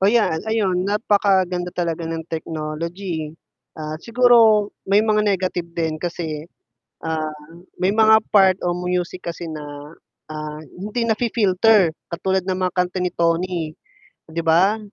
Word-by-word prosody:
Oh, 195 +2 +4
yan, 225 -9 +3
ayun 200 -5 0
napakaganda 195 -4 +1
talaga 170 -2 -2
ng 165 0 -3
technology, 160 +1 -4 0.4
at 155 0 -6
siguro 230 -3 +5 0.2
may 200 +2 +4
mga 215 -1 +2
negative 185 -3 -1
din 160 -2 -1
kasi, 160 -2 -4 0.6
ah, 160 -1 -2 0.5
may 190 +3 +1
mga 220 0 +6
part 190 -2 +4
o 175 - 0
music 180 0 -3
kasi 170 0 -8
na, 155 -2 -6 0.6
ah, 155 0 -6 0.2
hindi 215 +5 -3
nafi-filter, 215 -5 +3 0.2
katulad 190 +2 0
ng 185 0 -2
mga 185 -1 -1
kanta 180 0 0
ni 180 - +1
Toni 170 -1 0 0.6
'di 165 - -3
ba? 175 +6 +3
180 Hz, 135 wpm, -21 LUFS, 165-205 Hz, 0.6 s, mga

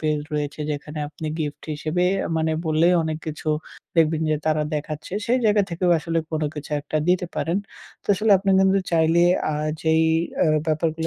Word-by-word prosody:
Page 155 -1 0
রয়েছে 150 0 -3
যেখানে 150 +1 -5
আপনি 155 +1 -7
গিফট 150 -2 -4
হিসেবে 160 +4 -1 0.3
মানে 160 0 +1
বলে 160 +2 +3
অনেক 160 -1 -3
কিছু 155 0 -5 0.5
দেখবেন 160 -1 +3
যে 155 - +2
তারা 155 -1 +2
দেখাচ্ছে। 150 +3 -5
সেই 245 +2 +3
জায়গা 210 -1 +4
থেকেও 175 +1 0
আসলে 165 +1 -1
কোনো 155 -1 0
কিছু 150 0 -8
একটা 150 +2 -4
দিতে 180 0 +2
পারেন। 170 +4 0 0.5
তো - - -22
আসলে 210 +3 0
আপনি 195 +1 0
কিন্তু 190 +1 +4
চাইলে 165 +1 +4 0.3
আ - - -1 0.3
যেই 160 0 +3 0.4
অ্যা 165 - +4 0.2
ব্যাপারগুলো 160 +1 0
160 Hz, 175 wpm, -23 LUFS, 155-170 Hz, 0.5 s, জায়গা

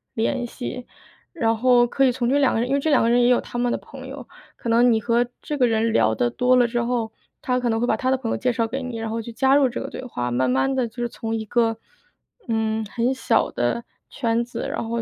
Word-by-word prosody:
联 240 +2 0
系。 250 0 -7 0.5
然 230 -9 +1
后 245 0 +4
可 270 +2 +2
以 255 - +4
从 240 -1 -1
这 280 - +3
两 275 -3 +3
个 - - 0
人 240 +2 -1
因 275 - +2
为 280 - +2
这 310 +2 0
两 285 - +5
个 230 - +2
人 240 +1 +4
也 - - +4
有 250 0 +4
他 - - -7
们 240 0 +1
的 - - 0
朋 265 -1 -11
友， 265 -2 -9 0.3
可 235 - -6
能 240 +2 +5
你 220 - +1
和 235 +2 +2 0.2
这 295 - -4
个 255 - +4
人 225 -1 +1
聊 110 - +3
得 120 +2 +1
多 250 - +2
了 245 -1 +4
之 240 0 -2
后， 235 -2 -1 0.3
他 250 -4 0
可 245 -1 -1
能 225 0 0
会 245 - +1
把 - - +1
他 260 0 0
的 265 - +2
朋 240 -3 -4
友 - - -1
介 250 -1 0
绍 230 -2 0
给 265 +3 -4
你， 245 -3 -5
然 225 - -4
后 225 - -3
你 225 - -3
去 235 - -7
加 265 +4 +3
入 280 -2 +5
这 245 - -5
个 - - -5
对 - - -7
话， 125 - -3
慢 130 +2 +1
慢 130 - +1
地 255 -3 0
就 220 - -19
是 240 0 -2
从 225 -1 -4
一 220 - -3
个， 225 +1 +1 0.7
嗯， 220 -1 0
很 235 +4 -1
小 235 -3 +1
的 120 - -1 0.3
圈 235 -2 0
子， 240 - -5
然 225 - -3
后 235 0 -2
240 Hz, 305 characters per minute, -23 LUFS, 225-255 Hz, 0.7 s, 两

